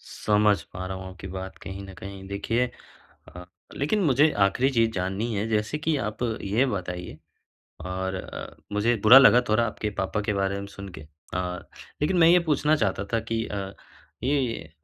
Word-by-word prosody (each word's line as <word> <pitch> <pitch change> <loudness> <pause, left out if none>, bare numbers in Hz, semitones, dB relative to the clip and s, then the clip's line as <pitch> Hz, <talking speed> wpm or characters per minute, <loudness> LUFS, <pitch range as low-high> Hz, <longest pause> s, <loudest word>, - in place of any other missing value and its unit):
समझ 105 -3 +3
पा 90 +1 -5
रहा 95 - -4
हूँ 95 0 -7
आपकी 95 0 -10
बात 95 0 -6
कहीं 95 +1 -7
न 95 - -10
कहीं 95 +1 -9
देखिए। 115 +5 -1 0.6
अ, 90 0 -10 0.3
लेकिन 175 +9 +1
मुझे 145 +2 +4 0.2
आखिरी 130 +7 +1
चीज़ 115 -3 +2
जाननी 95 +5 -2
है 100 +2 -1
जैसे 110 +7 0
कि 160 -1 +2
आप 105 +3 -5 0.2
ये 110 +7 +2
बताइए 90 -5 -4 0.7
और 95 +1 -3
अ, - - -7 0.3
मुझे 115 +4 +2
बुरा 125 +5 +11
लगा 135 -2 +7
थोड़ा 110 +2 +3
आपके 105 -1 -3
पापा 95 +2 -1
के - - +3
बारे 100 0 -1
में 100 - -6
सुन 100 0 -7
के - - -10
अ, 75 - -14 1.0
लेकिन 180 +5 +2
मैं 165 -1 +7
ये 180 - +7
पूछना 150 +1 +3
चाहता 100 -6 -1
था 115 - +2
कि 115 0 0
अ, 100 -1 -5 0.5
ये 130 - -1
105 Hz, 180 wpm, -26 LUFS, 95-125 Hz, 1.0 s, बुरा